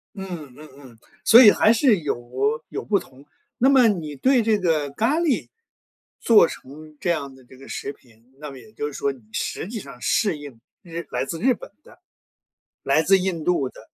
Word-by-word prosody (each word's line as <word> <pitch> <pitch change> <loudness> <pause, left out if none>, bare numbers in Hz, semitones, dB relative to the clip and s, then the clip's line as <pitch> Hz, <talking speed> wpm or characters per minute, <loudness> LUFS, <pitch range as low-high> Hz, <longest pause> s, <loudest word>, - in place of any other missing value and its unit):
嗯， 175 -9 -8
嗯 155 +1 -13
嗯。 130 -5 -16 0.2
所 230 +2 +8
以 210 - +9
还 215 - +3
是 230 -4 +3
有 140 +1 -2
有 - - -5
不 205 -2 +1
同。 135 +2 -17 0.3
那 265 - +3
么 260 -4 +5
你 160 -8 -2
对 255 - +2
这 220 -1 +2
个 160 -6 0
咖 235 - 0
喱 330 -6 0 0.7
做 220 -7 +5
成 155 +3 -12
这 175 - -2
样 140 -5 -2
的 130 - -18
这 130 +1 -18
个 135 - -14
食 140 - -5
品， 120 +1 -26
那 150 -1 -8
么 135 - -11
也 110 -3 -17
就 145 +6 -4
是 145 - -8
说 140 - -1
你 135 -2 -14
实 - - -4
际 220 +2 -6
上 140 -8 -12
适 185 - +1
应 145 -5 -11 0.2
日 170 -1 -7
来 - - -2
自 165 +4 -6
日 255 +6 +3
本 - - -12
的、 - - -19 0.8
来 155 - +2
自 195 +3 +4
印 180 -4 -3
度 155 -7 +1
的。 - - -15
155 Hz, 220 characters per minute, -22 LUFS, 135-210 Hz, 0.8 s, 以